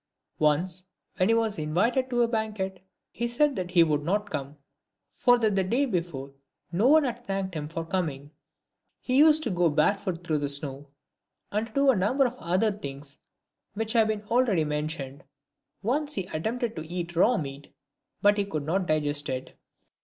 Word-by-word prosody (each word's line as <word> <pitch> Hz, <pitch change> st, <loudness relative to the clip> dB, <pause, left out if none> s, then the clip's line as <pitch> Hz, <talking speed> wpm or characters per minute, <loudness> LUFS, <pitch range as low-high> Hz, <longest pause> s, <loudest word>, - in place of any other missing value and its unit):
" -, -, -58 dB
Once, 170 Hz, +5 st, +1 dB, 0.3 s
when 185 Hz, +1 st, +2 dB
he 230 Hz, -, +5 dB
was 225 Hz, -5 st, 0 dB
in 155 Hz, 0 st, -3 dB
vited 250 Hz, +7 st, +2 dB
to 240 Hz, -1 st, +2 dB
a -, -, +2 dB
banquet, 210 Hz, -5 st, -3 dB, 0.3 s
he 235 Hz, -, -2 dB
said 280 Hz, +4 st, +2 dB
that 185 Hz, -3 st, -3 dB
he 175 Hz, -2 st, +5 dB
would 150 Hz, -2 st, +1 dB
not 205 Hz, +6 st, -1 dB
come: 145 Hz, -1 st, -5 dB, 0.6 s
for 245 Hz, 0 st, +4 dB
that 220 Hz, -3 st, +1 dB
the 190 Hz, -, +2 dB
day 240 Hz, +10 st, +1 dB
before 170 Hz, -, -3 dB, 0.4 s
no 195 Hz, +8 st, +2 dB
one 310 Hz, +2 st, +6 dB
had 245 Hz, -2 st, -3 dB
thanked 195 Hz, -4 st, -3 dB
him 150 Hz, -2 st, -4 dB
for 165 Hz, +1 st, -5 dB
coming. 150 Hz, -6 st, -3 dB, 0.7 s
He 255 Hz, 0 st, 0 dB
used 310 Hz, +1 st, +6 dB
to 230 Hz, -, -1 dB
go 175 Hz, -2 st, +2 dB
bare 155 Hz, +6 st, +3 dB
foot 185 Hz, -4 st, -5 dB
through 155 Hz, -3 st, 0 dB
the 145 Hz, -1 st, -1 dB
snow, 140 Hz, 0 st, -3 dB, 0.6 s
and 215 Hz, +2 st, -1 dB
to 220 Hz, -, -19 dB
do 275 Hz, -1 st, +4 dB
a -, -, 0 dB
number 230 Hz, +9 st, +2 dB
of 245 Hz, -, -1 dB
other 185 Hz, +6 st, +1 dB
things 140 Hz, -7 st, -8 dB, 0.6 s
which 220 Hz, +1 st, -2 dB
have 225 Hz, -2 st, +4 dB
been 215 Hz, -1 st, -2 dB
already 225 Hz, -6 st, +2 dB
mentioned. 150 Hz, -2 st, -4 dB, 0.6 s
Once 290 Hz, +7 st, 0 dB
he 190 Hz, -3 st, -3 dB
at 155 Hz, -, -4 dB
tempted 235 Hz, 0 st, -1 dB
to 160 Hz, 0 st, -5 dB
eat 175 Hz, -1 st, -4 dB
raw 230 Hz, +8 st, +4 dB
meat, 140 Hz, -1 st, -6 dB, 0.5 s
but 205 Hz, 0 st, +5 dB
he 200 Hz, -, +1 dB
could 155 Hz, -7 st, -3 dB
not 180 Hz, +5 st, -1 dB
digest 145 Hz, -1 st, 0 dB
it. 130 Hz, 0 st, -5 dB
190 Hz, 195 wpm, -27 LUFS, 155-230 Hz, 0.7 s, one